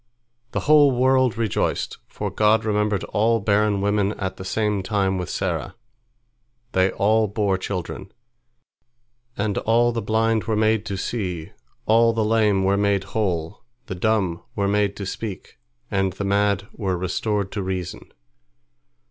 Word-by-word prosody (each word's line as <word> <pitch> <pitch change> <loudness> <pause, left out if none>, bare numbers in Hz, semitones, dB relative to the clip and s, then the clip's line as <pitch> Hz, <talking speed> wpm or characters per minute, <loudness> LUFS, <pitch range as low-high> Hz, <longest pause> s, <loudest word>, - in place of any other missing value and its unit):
The - - -2
whole 150 -1 +6
world 130 -2 +2
rejoiced, 115 -4 -1
for - - -5
God 110 +1 +3
remembered 105 -2 0
all 115 +2 +1
barren 100 0 +2
women 100 0 +1
at 95 -2 -4
the 95 - -7
same 105 +1 0
time 95 -1 0
with 90 - -4
Sarah. - - -3 1.0
They 95 +1 +3
all 110 +3 +2
bore 100 -1 0
children. 95 0 -5 1.3
And 105 -1 0
all 120 +2 +3
the 115 -1 -2
blind 110 +1 +1
were 110 -1 0
made 110 0 +1
to 100 -3 -3
see, 90 -6 -4 0.3
all 115 +1 +4
the 110 -1 0
lame 105 -3 +2
were 100 +1 +2
made 100 -1 +1
whole, 95 -3 -2 0.2
the - - -5
dumb 95 -3 0
were 100 -1 0
made 100 0 +1
to 100 - -5
speak, 95 0 -6 0.3
and 95 -2 0
the 100 - -4
mad 100 0 +1
were 95 -5 -2
restored 95 +2 -2
to 100 - -3
reason. 95 -2 -5
105 Hz, 150 wpm, -23 LUFS, 95-110 Hz, 1.3 s, whole